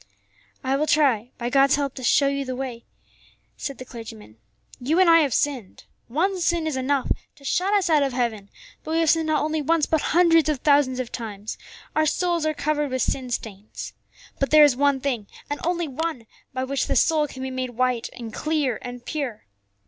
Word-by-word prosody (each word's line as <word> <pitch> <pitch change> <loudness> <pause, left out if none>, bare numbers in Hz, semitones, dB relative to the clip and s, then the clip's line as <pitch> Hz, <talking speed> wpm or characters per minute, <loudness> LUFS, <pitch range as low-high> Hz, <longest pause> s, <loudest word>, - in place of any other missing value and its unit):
"I 265 +1 +1
will 305 +2 0
try, 260 -8 +2
by 240 -1 -3
God's 275 +1 +5
help, 280 -2 -2
to 260 - -8
show 280 +4 +4
you 280 0 -1
the 255 -1 -4
way," 250 -3 -6 0.7
said 275 - -5
the 255 - -9
clergyman. 110 - -10 0.4
"You 295 +8 +1
and 375 - +5
I 330 0 +7
have 290 -4 +2
sinned. 255 -7 -2 0.2
One 365 +10 0
sin 340 -1 +1
is 310 -3 -1
enough 265 +1 0 0.2
to 285 -2 -17
shut 370 +7 +1
us 395 -3 +2
out 310 -3 +4
of 275 -1 +1
heaven, 230 -5 -2 0.3
but 315 - -4
we - - +2
have 320 - +4
sinned 325 -1 +1
not 310 -1 +1
only 310 0 -1
once, 315 +1 +2
but 320 -2 +1
hundreds 330 -2 +4
of 285 -4 -1
thousands 280 -3 +3
of 250 -2 -4
times; 215 -3 -6 0.4
our 310 0 +3
souls 345 -1 0
are 310 - -1
covered 295 -1 -1
with 260 -2 0
sin 260 -2 -2
stains. 215 -3 -6 0.5
But 275 - +1
there 305 0 +8
is 290 -4 +5
one 280 0 +2
thing, 245 -7 -2 0.2
and 290 - -2
only 345 -1 0
one, 295 -3 -4 0.3
by 260 0 -3
which 275 +1 -1
the - - 0
soul 310 -2 +3
can 260 -1 -8
be 265 - -4
made 255 0 -3
white 250 -2 0
and 230 -3 -8
clear 300 -6 -1
and 245 -1 -8
pure. 280 -8 -4
275 Hz, 210 wpm, -24 LUFS, 250-310 Hz, 0.7 s, there